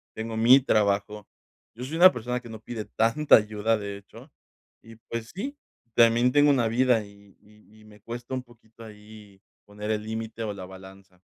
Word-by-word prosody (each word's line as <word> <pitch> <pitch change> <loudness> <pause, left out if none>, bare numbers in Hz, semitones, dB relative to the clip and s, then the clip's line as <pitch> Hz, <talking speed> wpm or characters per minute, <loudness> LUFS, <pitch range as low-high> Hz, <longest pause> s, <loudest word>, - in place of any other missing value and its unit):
tengo 110 0 -5
mi 125 +4 +7
trabajo, 105 -2 0 0.5
yo 120 - -8
soy 155 +5 -5
una 185 +2 +8
persona 125 +1 -3
que 120 - -12
no 110 - -9
pide 110 -2 -6
tanta 140 +7 +3
ayuda, 110 +1 -1
de 100 -1 -6
hecho, 100 - -16 0.5
y 115 0 -14
pues 115 0 -5
sí, 275 +9 -5 0.4
también 120 +2 +4
tengo 145 +1 +4
una 125 -5 +2
vida 120 -2 +2
y 100 -1 -19
y 105 +1 -22
y - - -19
me 105 -1 -17
cuesta 120 +3 -8
un 130 - -4
poquito 115 -2 -18
ahí 105 -2 -15 0.2
poner 105 +1 -6
el 105 -1 -2
límite 110 +1 -5
o 105 - -3
la 95 -2 -8
balanza. 95 0 -15
110 Hz, 185 wpm, -26 LUFS, 105-120 Hz, 0.5 s, una